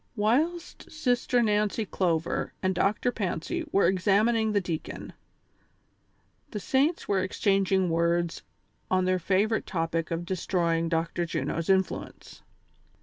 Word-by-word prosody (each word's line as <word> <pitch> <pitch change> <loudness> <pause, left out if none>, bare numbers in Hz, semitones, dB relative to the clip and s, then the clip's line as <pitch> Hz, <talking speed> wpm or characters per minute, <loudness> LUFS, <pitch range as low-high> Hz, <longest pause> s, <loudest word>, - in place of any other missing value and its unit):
AVhilst 310 +12 0
Sister 245 -5 +1
Nancy 210 0 +1
Clover 170 -4 -1
and 185 0 +2
Dr. 205 +6 +1
Fancy 185 -8 -3
were 200 - +3
exam 195 +3 +3
ining 225 -2 +1
the 205 - +2
deacon, 170 -4 -5 1.4
the 210 - -5
saints 280 - +1
were 200 -2 +2
exchanging 190 0 +1
words 170 0 0 0.5
on 185 0 +2
tlieir 185 0 +1
favorite 205 +5 +1
topic 165 -2 -2
of 170 +1 -3
destroying 170 -2 0
Dr. 165 +1 -1
Juno's 165 +1 -3
influence. 190 -1 -1
190 Hz, 120 wpm, -27 LUFS, 170-215 Hz, 1.4 s, were